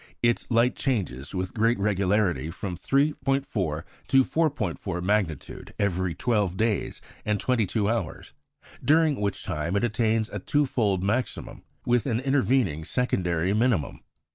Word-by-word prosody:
Its 120 0 +1
light 120 +1 +3
changes 95 - -2
with 90 0 -3
great 115 +2 +2
regularity 100 -6 +1
from 90 +2 -5
3·4 135 - 0 0.2
to 135 0 +5
4·4 140 - -1
magnitude 95 -5 -2
every 95 -3 0
twelve 105 -7 0
days 110 -1 -1 0.2
and 105 -1 0
twenty 120 -5 +1
two 105 +1 0
hours, 110 -7 -3 0.5
during 155 -4 +3
which 100 -1 -2
time 75 +5 -2
it 100 - +1
attains 110 -1 +1
a 105 - -5
twofold 110 -6 +1
maximum, 120 +6 -2 0.2
with 120 +1 +2
an 115 -3 +1
intervening 130 - +1
secondary 90 -5 0
minimum. 110 - +1
105 Hz, 130 wpm, -26 LUFS, 95-125 Hz, 0.5 s, to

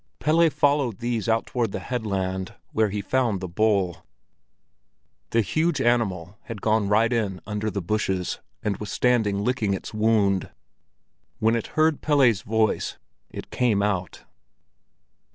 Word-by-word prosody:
Pelle 165 +3 +3
followed 145 -5 +1
these 120 -2 -2
out 115 0 +2
toward 120 -4 -1
the - - -3
headland, 95 -6 -3 0.2
where 110 -1 +2
he 100 0 -3
found 120 -3 +1
the 95 - -5
bull. 95 -2 +1 1.3
The 115 - +2
huge 155 - 0
animal 105 -5 0
had 115 -3 -6
gone 110 0 +1
right 110 +3 +3
in 100 -6 -1
under 105 +1 -2
the 100 -3 -4
bushes, 95 -2 -1 0.2
and 105 -2 -1
was 105 -1 -6
standing 110 -5 +1
licking 110 -5 0
its 95 - -8
wound. 105 -3 +2 0.9
When 110 +1 +2
it 115 - -2
heard 155 -1 +3
Pelle's 130 -9 +3
voice, 110 +1 0 0.3
it - - -9
came 110 -5 +2
out. 95 -4 -2
110 Hz, 140 wpm, -25 LUFS, 100-120 Hz, 1.3 s, Pelle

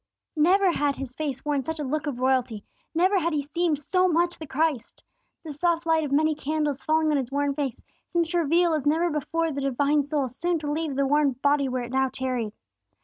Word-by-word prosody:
Never 365 +5 +4
had 290 -4 0
His 265 -2 -6
face 280 -2 -4
worn 290 -2 0
such 320 +4 -5
a - - -2
look 305 +3 -2
of 280 -4 -3
royalty; 250 -4 0 0.3
never 375 +4 +3
had 335 -1 -1
He 290 -2 0
seemed 315 +1 0
so 365 +6 +1
much 345 0 +1
the 315 - -7
Christ. 285 -4 -2 0.4
The 310 -3 -6
soft 335 +3 0
light 320 -1 +2
of 290 - -4
many 310 +2 +3
candles 300 -1 -2
falling 315 0 +2
on 295 - +2
His 265 -2 -3
worn 285 0 0
face 275 -4 -3 0.3
seemed 345 -1 +1
to 350 - +2
reveal 335 +2 +2
as 300 -2 -1
never 330 +3 +2
before 325 +2 -1
the 280 -1 -4
divine 280 +2 +2
soul 285 -1 -1
soon 340 +8 -1
to 295 -2 -4
leave 310 -2 -2
the 275 0 +1
worn 290 0 +2
body 280 +2 +1
where 255 -1 -2
it 240 - -7
now 265 0 +1
tarried. 255 -5 -2
295 Hz, 220 wpm, -25 LUFS, 275-325 Hz, 0.4 s, Never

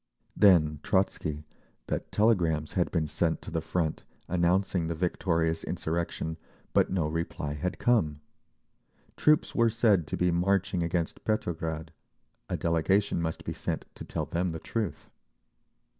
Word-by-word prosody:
Then 75 -7 +5
Trotzky, 80 -5 0 0.4
that - - -3
telegrams 85 -8 +2
had 90 -2 +1
been 80 -3 0
sent 80 +2 0
to - - -8
the 80 -1 -1
front 80 -1 -1 0.3
announcing 90 0 +1
the 85 - -2
victorious 80 -1 0
insurrection, 80 -1 -2 0.4
but - - +4
no 90 -4 0
reply 80 -2 -3
had 80 +5 -3
come. 80 -12 +2 1.0
Troops 150 0 +3
were 115 -1 +4
said 105 -7 +3
to - - -3
be 90 0 +2
marching 95 +1 +1
against 85 0 -2
Petrograd—a 80 - -4
delegation 85 +3 +1
must 80 -1 -3
be - - -3
sent - - -3
to - - -9
tell - - -3
them 90 +2 -1
the 80 - -5
truth. 110 -1 -4
85 Hz, 135 wpm, -29 LUFS, 80-95 Hz, 1.0 s, Then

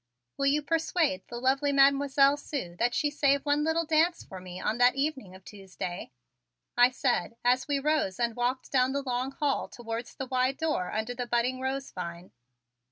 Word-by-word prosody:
Will 275 - 0
you 295 +2 +2
persuade 320 -1 0
the 240 - -6
lovely 270 +3 +1
Mademoiselle 275 0 +4
Sue 275 - -6
that 240 +1 +1
she 295 -1 +1
save 280 -1 +2
one 290 0 +2
little 320 +1 +1
dance 325 +2 +2
for 190 - -10
me 180 0 -9
on 220 +5 -2
that 245 +1 +5
evening 275 -9 -3
of 190 0 -16
Tuesday?" 190 -3 -7 0.7
I 245 +1 +6
said 230 -4 -1
as 250 +3 +3
we 285 -1 +1
rose 295 -9 0
and 235 -2 0
walked 245 +2 -2
down 260 0 +2
the 280 0 -2
long 255 0 -2
hall 280 0 -1
towards 230 -1 -6
the 265 - -4
wide 255 +1 0
door 305 - -1
under 220 +3 -2
the 245 0 -5
budding 240 +2 0
rose 265 +1 -3
vine. 175 -1 -7
260 Hz, 185 wpm, -28 LUFS, 235-285 Hz, 0.7 s, I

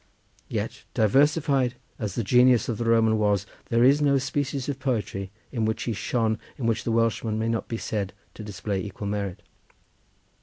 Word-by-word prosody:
Yet, - - -4
diversified 135 +2 +3 0.2
as 105 -4 -3
the 115 - 0
genius 125 +2 +5
of 115 -4 -2
the 120 - -1
Roman 110 -1 +4
was, 100 -2 +2 0.2
there 115 0 +3
was 140 +4 +5
no 140 -1 +4
species 135 0 -2
of 140 -2 -3
poetry 110 -7 -2 0.2
in 115 -4 -1
which 110 0 0
he 115 - -1
shone 110 +1 0 0.2
in 130 - -3
which 115 -1 +1
the 115 - 0
Welshman 115 -1 +1
may 110 +1 0
not 115 -1 -1
be 115 - -3
said 100 -4 -3 0.2
to 110 - -9
display 100 -1 -3
equal 105 0 -6
merit. 100 -2 -3
115 Hz, 180 wpm, -26 LUFS, 105-130 Hz, 0.2 s, genius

